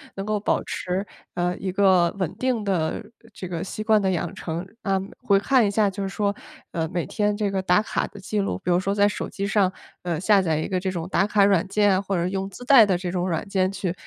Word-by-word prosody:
能 195 - -4
够 215 0 0
保 205 - 0
持， 185 +2 -3 0.3
呃， 180 0 -1
一 190 - -3
个 185 -3 +4
稳 185 -5 -2
定 255 -4 0
的 185 -1 -1 0.3
这 185 - -7
个 170 -2 -3
习 215 +2 -5
惯 215 -1 +4
的 190 -1 +1
养 170 -2 -2
成。 165 0 -4 0.2
啊， 195 -1 +1 0.2
回 200 -1 +3
看 250 +2 +3
一 - - +1
下 205 0 +2
就 200 +1 -6
是 - - -2
说， 200 +1 -1 0.4
呃， 165 -2 -2
每 175 0 -3
天 210 -1 0
这 205 -1 -1
个 190 -1 -1
打 185 +1 +3
卡 215 - -2
的 - - -14
记 210 +2 -3
录， 200 - -1
比 180 - 0
如 175 - +4
说 195 +2 -1
在 205 0 +4
手 - - -4
机 200 - -4
上， 200 -1 +2 0.3
呃， 175 -2 -1
下 200 0 +4
载 160 -4 0
一 155 - -2
个 185 -2 0
这 190 +1 -2
种 170 -3 -4
打 195 - +2
卡 205 -1 +3
软 195 -3 +3
件 205 +1 +3
啊， 185 - +1
或 195 0 -2
者 170 -1 0
用 195 0 -3
自 200 +5 -11
带 245 -3 +7
的 190 -3 +1
这 180 0 -4
种 180 0 -1
软 165 +1 -2
件 185 -1 +1
去 190 -3 -3
195 Hz, 275 characters per minute, -24 LUFS, 180-205 Hz, 0.4 s, 带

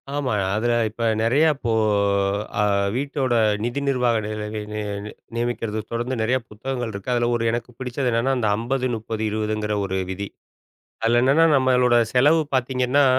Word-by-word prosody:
ஆமா. 135 -5 -1 0.2
அதுல 120 +2 +1 0.2
இப்ப, 115 +2 -6 0.2
நெறைய 135 +8 +3
அப்போ 120 -5 -3 0.9
அ - - +4 0.4
வீட்டோட 135 -2 -1 0.3
நிதி 120 +4 -2
நிர்வாக 125 -4 +2
நி - - -4
நி 105 - -5 0.2
நி 105 - -3 0.2
நி 105 - -7 0.2
நியமிக்குறத 115 -2 -2
தொடர்ந்து 120 +3 -2
நெறைய 125 +4 +2
புத்தகங்கள் 120 +2 -4
இருக்கு. 100 +5 -6
அதுல 120 -1 +1
1 115 - -1
எனக்கு 120 +1 -3
பிடிச்சது 125 0 -2
என்னன்னா, 120 +4 +1
அந்த 110 -3 0
50, 130 +3 -1
30, 110 0 -5
20ங்குற 105 0 -2
ஒரு 95 0 -2
விதி. 100 +2 -4 0.8
அதுல 120 +1 +3
என்னென்னா, 150 +5 +5
நம்பளோட 125 -2 +3 0.2
செலவு 145 +6 +5
பாத்தீங்கன்னா, 130 +2 +2
120 Hz, 155 wpm, -23 LUFS, 110-130 Hz, 0.9 s, என்னென்னா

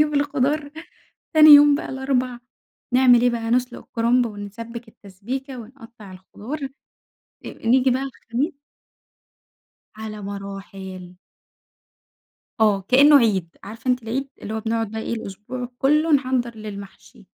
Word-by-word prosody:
ونجيب 300 -1 +2
الخضار، 285 +1 0 0.6
تاني 310 0 +8
يوم 290 0 +9
بقى 295 - -4
الأربع، 260 -2 -2 0.6
نعمل 250 -2 +6
إيه 245 - +4
بقى، 230 -1 -3
نسلُق 250 +1 0
الكرمب 240 +1 +1
ونسبّك 225 +3 -8
التسبيكة 245 +8 -7
ونقطّع 230 -4 -13
الخضار، 210 +10 -8 0.9
إ - - -4 0.2
نيجي 255 +2 +4
بقى 260 +2 0
الخميس 270 +3 -4 1.4
على 215 -1 -7
مراحل. 195 -2 -8 1.4
آه 210 -3 +3
كإنه 285 +3 +7
عِيد، 200 -9 +1
عارفة 225 +5 -6
أنتِ 250 -1 -2
العيد؟ 260 +5 -3
اللي 210 - -6
هو 220 - -2
بنقعد 225 -1 -2
بقى 220 - -4
إيه، - - -4
الأسبوع 225 +3 -6
كُلّه 305 +4 +2
نحضّر 255 -4 +1
للمحشي. 210 +1 -11
235 Hz, 125 wpm, -22 LUFS, 210-265 Hz, 1.4 s, يوم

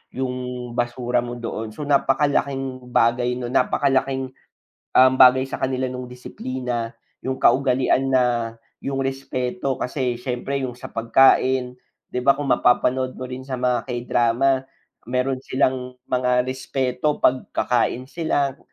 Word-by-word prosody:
'yong 125 -1 -4
basura 120 0 0
mo 120 0 -5
doon, 115 -2 -5
so 150 - -5
napakalaking 135 -2 0
bagay 120 +1 +2
'no 125 -1 -5
napakalaking, 135 -1 +1 0.7
um, 130 0 +7
bagay 130 0 +7
sa 135 - -6
kanila 130 0 -1
ng 125 0 -6
disiplina, 125 -2 -5 0.3
'yong 130 0 -2
kaugalian 130 0 +3
na 130 -1 +4 0.6
'yong 135 0 -2
respeto 135 -1 -2
kasi 125 -1 -2
s'yempre 125 +2 -3
'yong 125 -2 -4
sa 120 - -10
pagkain, 125 +2 +3 0.3
'di 125 - -3
ba 140 - +6
kung 145 -1 -3
mapapanood 130 +1 +2
mo - - -8
rin 130 +1 -7
sa 130 - -4
mga 125 0 0
K-drama, 125 +2 +1 0.4
meron 125 +1 0
silang 130 -1 0 0.2
mga 125 0 +2
respeto 130 +2 -2
pagkakain 125 -1 +1
sila, 145 -4 -1
130 Hz, 130 wpm, -22 LUFS, 125-135 Hz, 0.7 s, um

